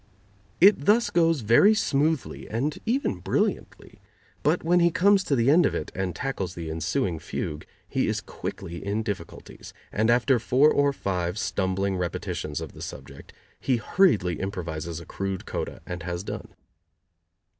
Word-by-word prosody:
It 190 Hz, -5 st, +6 dB
thus 225 Hz, +3 st, +4 dB
goes 165 Hz, -4 st, +3 dB
very 120 Hz, -, +5 dB
smoothly 155 Hz, -, 0 dB
and 135 Hz, +7 st, -2 dB
even 265 Hz, +5 st, 0 dB
brilliantly, -, -, -2 dB, 0.4 s
but -, -, +1 dB
when 175 Hz, +2 st, +3 dB
he 170 Hz, 0 st, +5 dB
comes 195 Hz, +3 st, +4 dB
to 140 Hz, -, +1 dB
the 120 Hz, +2 st, +3 dB
end 175 Hz, +4 st, +6 dB
of -, -, +1 dB
it -, -, -4 dB
and 95 Hz, -2 st, -3 dB
tackles 100 Hz, -10 st, -3 dB
the 80 Hz, -2 st, -5 dB
ensuing 80 Hz, +1 st, -1 dB
fugue 75 Hz, 0 st, -5 dB, 0.2 s
he -, -, 0 dB
is -, -, 0 dB
quickly 85 Hz, +1 st, -7 dB
in 105 Hz, +2 st, -1 dB
difficulties, 100 Hz, -6 st, -7 dB, 0.2 s
and 110 Hz, +2 st, +1 dB
after 125 Hz, +2 st, +3 dB
four 135 Hz, +7 st, +4 dB
or 145 Hz, 0 st, +3 dB
five 90 Hz, -7 st, -2 dB
stumbling 95 Hz, 0 st, -1 dB
repetitions 80 Hz, -4 st, -3 dB
of -, -, -7 dB
the -, -, -12 dB
subject 70 Hz, 0 st, -9 dB, 0.3 s
he 130 Hz, -2 st, +1 dB
hurriedly 110 Hz, -, +2 dB
improvises 85 Hz, -4 st, -4 dB
a 85 Hz, -, -11 dB
crude 95 Hz, -1 st, -4 dB
coda -, -, -5 dB
and 90 Hz, 0 st, -6 dB
has 85 Hz, +1 st, -4 dB
done. -, -, -6 dB
105 Hz, 155 wpm, -26 LUFS, -, 0.4 s, It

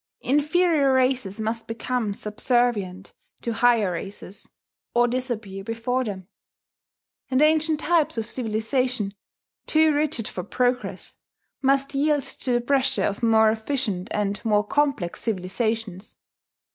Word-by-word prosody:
Inferior 300 Hz, 0 st, +2 dB
races 255 Hz, -6 st, +1 dB
must 225 Hz, +1 st, -3 dB
become 230 Hz, -1 st, -2 dB
subservient 210 Hz, -4 st, 0 dB, 0.3 s
to 235 Hz, -, -1 dB
higher 230 Hz, -4 st, +3 dB
races, 195 Hz, +2 st, -7 dB, 0.5 s
or 240 Hz, 0 st, +4 dB
disappear 235 Hz, -6 st, -4 dB
before 230 Hz, +4 st, -1 dB
them; 190 Hz, -5 st, -6 dB, 1.0 s
and 260 Hz, -1 st, +2 dB
ancient 310 Hz, 0 st, +3 dB
types 335 Hz, -7 st, +2 dB
of 225 Hz, -, -1 dB
civilization, 230 Hz, -1 st, -1 dB, 0.5 s
too 315 Hz, 0 st, +4 dB
rigid 290 Hz, -6 st, 0 dB
for 180 Hz, -, -5 dB
progress, 250 Hz, +5 st, -2 dB, 0.4 s
must 275 Hz, +1 st, +2 dB
yield 290 Hz, 0 st, +2 dB
to 255 Hz, -, -2 dB
the 240 Hz, 0 st, +2 dB
pressure 265 Hz, +1 st, +2 dB
of 200 Hz, +2 st, -1 dB
more 220 Hz, -1 st, +5 dB
efficient 220 Hz, -5 st, -1 dB
and 205 Hz, -1 st, -1 dB
more 210 Hz, -2 st, +2 dB
complex 275 Hz, -7 st, 0 dB
civilizations. 215 Hz, 0 st, -3 dB
240 Hz, 120 wpm, -24 LUFS, 210-270 Hz, 1.0 s, more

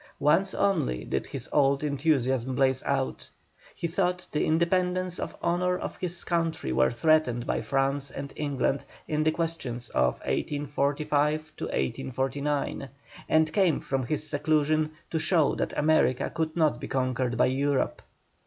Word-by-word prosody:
Once 165 Hz, +7 st, +2 dB
only 170 Hz, -, +1 dB
did 65 Hz, -, -2 dB
his 130 Hz, -3 st, -6 dB
old 140 Hz, -1 st, +3 dB
enthusiasm 135 Hz, -4 st, +1 dB
blaze 130 Hz, 0 st, +2 dB
out. 135 Hz, -1 st, -1 dB, 0.5 s
He 170 Hz, -, -4 dB
thought 180 Hz, +1 st, 0 dB
the 150 Hz, -, 0 dB
independence 180 Hz, +2 st, +1 dB
and -, -, -3 dB
honour 180 Hz, +1 st, +1 dB
of -, -, -5 dB
his 175 Hz, -1 st, -3 dB
country 165 Hz, -, -1 dB
were 65 Hz, +1 st, +4 dB
threatened 125 Hz, -3 st, +2 dB
by -, -, -1 dB
France 135 Hz, 0 st, 0 dB
and 140 Hz, +1 st, -7 dB
England 140 Hz, -1 st, -1 dB, 0.2 s
in 150 Hz, 0 st, 0 dB
the 155 Hz, +1 st, +3 dB
questions 155 Hz, -8 st, -3 dB
of 65 Hz, 0 st, +2 dB
1845 145 Hz, +1 st, 0 dB
1849, 135 Hz, -, -2 dB, 0.4 s
and 155 Hz, 0 st, +3 dB
came 185 Hz, -7 st, +3 dB
from 135 Hz, -1 st, -2 dB
his 155 Hz, +2 st, -1 dB
seclusion 155 Hz, +1 st, +1 dB, 0.2 s
to 160 Hz, -, 0 dB
show 160 Hz, -3 st, +3 dB
that -, -, -3 dB
America 150 Hz, -4 st, +2 dB
could 160 Hz, -1 st, -2 dB
not 160 Hz, -3 st, +2 dB
be -, -, -4 dB
conquered 130 Hz, -2 st, -1 dB
by -, -, +5 dB
Europe. 135 Hz, +1 st, 0 dB
145 Hz, 145 wpm, -27 LUFS, 135-160 Hz, 0.5 s, by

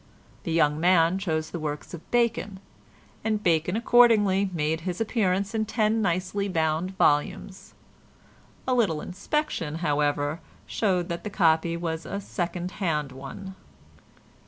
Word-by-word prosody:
The -, -, -2 dB
young 150 Hz, -2 st, +2 dB
man 175 Hz, +1 st, +4 dB
chose 160 Hz, -4 st, -2 dB
the 175 Hz, -, -4 dB
works 150 Hz, +1 st, -5 dB
of 165 Hz, -, -10 dB
Bacon, 235 Hz, -5 st, 0 dB, 0.6 s
and 215 Hz, -1 st, -1 dB
Bacon 170 Hz, +2 st, +2 dB
accordingly 215 Hz, -5 st, +4 dB
made 160 Hz, -1 st, -1 dB
his 180 Hz, +1 st, -4 dB
appearance 200 Hz, -3 st, 0 dB
in 220 Hz, -1 st, 0 dB
ten 220 Hz, 0 st, +1 dB
nicely 190 Hz, +1 st, -1 dB
bound 165 Hz, +2 st, -1 dB
volumes. 150 Hz, +6 st, 0 dB, 0.9 s
A 255 Hz, -, +2 dB
little 205 Hz, -11 st, +2 dB
inspection, 185 Hz, -, -3 dB
however, 145 Hz, -1 st, 0 dB, 0.3 s
showed 185 Hz, -5 st, 0 dB
that 170 Hz, 0 st, -4 dB
the 210 Hz, -, -4 dB
copy 170 Hz, -3 st, +2 dB
was 165 Hz, -1 st, -4 dB
a 200 Hz, -, -3 dB
second 175 Hz, -2 st, -4 dB
hand 150 Hz, -6 st, 0 dB
one. 135 Hz, +9 st, -8 dB
180 Hz, 135 wpm, -26 LUFS, 160-200 Hz, 0.9 s, man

